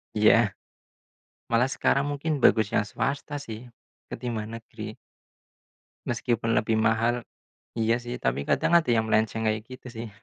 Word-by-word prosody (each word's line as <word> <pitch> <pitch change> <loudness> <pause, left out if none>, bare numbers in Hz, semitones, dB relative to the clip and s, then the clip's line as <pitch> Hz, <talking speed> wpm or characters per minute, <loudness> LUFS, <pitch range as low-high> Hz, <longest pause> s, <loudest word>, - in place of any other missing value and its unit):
Iya. 105 -1 +5 1.0
Malah 115 +2 +4
sekarang 140 +1 +1
mungkin 145 +1 -1
bagus 110 -5 +4
yang 105 - +1
swasta 140 +7 -3
sih, 115 -2 -8 0.4
ketimbang 115 -2 -5
negeri. 110 -1 -8 1.1
Meskipun 115 -1 0
lebih 110 0 +1
mahal. 115 +2 +2 0.6
Iya 115 +1 +3
sih, 120 0 -6
tapi 60 +3 +1
kadang - - +2
ada 160 - -3
yang 110 -1 +2
melenceng 110 0 +1
kayak 110 0 0
gitu 130 0 -11
sih. 115 0 -6
115 Hz, 135 wpm, -26 LUFS, 110-125 Hz, 1.1 s, Iya